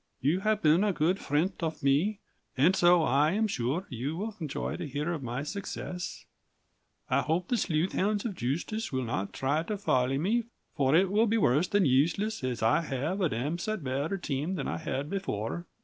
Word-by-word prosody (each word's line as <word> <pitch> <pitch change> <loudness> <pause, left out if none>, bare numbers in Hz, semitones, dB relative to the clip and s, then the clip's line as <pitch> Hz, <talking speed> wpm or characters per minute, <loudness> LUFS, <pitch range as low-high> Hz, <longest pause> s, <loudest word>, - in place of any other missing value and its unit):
"You 150 +8 +2
have 215 +1 0
Bin 160 +5 +5
a 210 - +3
good 175 +4 +1
frent 165 +8 -1
off 160 -3 -3
me 160 +10 +2 0.4
and 165 +8 +4
so 175 -2 +5
I 150 +2 +3
am 220 +2 +2
shure 145 - -1
you 135 +6 -3
will 215 +2 -4
enjoy 155 -5 -3
to - - -4
heer 150 +5 -2
of 160 - -4
my 125 +2 -3
success 180 0 -5 0.8
i - - +2
hope 170 +3 -1
the 245 - +2
slooth 175 -4 0
hounds 205 +2 0
of 225 - -2
Justiss 170 - -3
will 130 -1 -1
not 100 -5 -2
try 140 +4 0
to 205 +5 -3
folly 130 -8 +1
me 215 +10 +1 0.3
for 140 -1 +3
it 185 +2 +4
will 220 +3 +3
be 225 +2 +2
worse 150 - +3
than 200 0 +2
Useles 160 +10 +1
as 125 -3 -2
i 115 +8 +4
have 155 +6 -2
a 175 - +3
damsite 170 - -2
better 140 +8 -1
team 155 +1 -2
than - - -3
i - - -2
had 145 -3 -3
Before. 170 - -3
165 Hz, 195 wpm, -29 LUFS, 135-195 Hz, 0.8 s, Bin